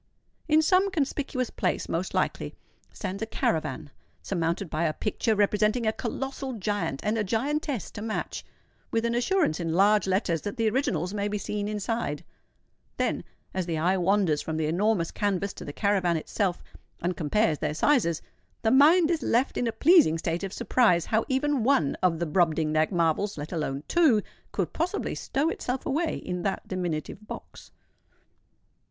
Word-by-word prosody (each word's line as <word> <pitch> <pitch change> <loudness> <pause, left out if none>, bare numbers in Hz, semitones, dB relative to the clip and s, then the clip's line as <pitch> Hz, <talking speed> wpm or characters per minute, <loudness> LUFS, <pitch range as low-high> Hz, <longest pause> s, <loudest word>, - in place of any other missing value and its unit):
In 315 0 +4
some 375 +4 +4
conspicuous 275 - -2
place 180 - -1
most 170 +3 -2
likely - - -1 0.4
stands 195 0 -5
a 220 - -2
caravan, 160 -5 -2 0.3
surmounted 170 +1 -1
by 155 +1 -1
a 155 - +1
picture 220 +3 0
representing 210 +3 +2
a 220 - +2
colossal 270 +2 -4
giant 205 - -2
and 215 +2 0
a - - +1
giantess 265 - -1
to 205 - -8
match, 220 0 -3 0.5
with 230 0 0
an 235 - +1
assurance 245 - +1
in 165 -2 -2
large 205 +1 +4
letters 185 -4 +1
that 205 +5 -5
the 225 -1 +2
originals 200 - 0
may 205 -1 -1
be 210 0 -2
seen 205 0 -3
inside:—then, 210 -7 -4 0.3
as 185 -2 -2
the 165 -2 -1
eye 175 +4 +2
wanders 185 -4 +2
from 160 -1 -3
the 160 - 0
enormous 175 +2 +1
canvass 200 -1 -1
to - - -9
the - - -5
caravan 185 -2 +1
itself, 180 +3 -2 0.4
and 180 +1 0
compares 165 +1 +1
their 150 -1 -2
sizes, 170 - +2 0.4
the 220 - +3
mind 315 +5 +6
is 325 -3 0
left 245 +3 +1
in 245 - 0
a - - +1
pleasing 295 - +5
state 165 +2 -2
of 195 - -3
surprise 180 -8 +2
how 220 0 +1
even 265 -1 +1
one 230 - +2
of 180 -3 +2
the 170 - -1
Brobdingnag 155 -1 +2
marvels—let 165 -1 0
alone 150 -5 -2
two—could 300 -12 +1
possibly 355 +5 -1
stow 280 +4 -1
itself 250 -4 -3
away 315 +3 0
in 180 -1 -4
that 195 0 -2
diminutive 180 +2 -4
box. - - -9
205 Hz, 160 wpm, -27 LUFS, 170-245 Hz, 0.5 s, mind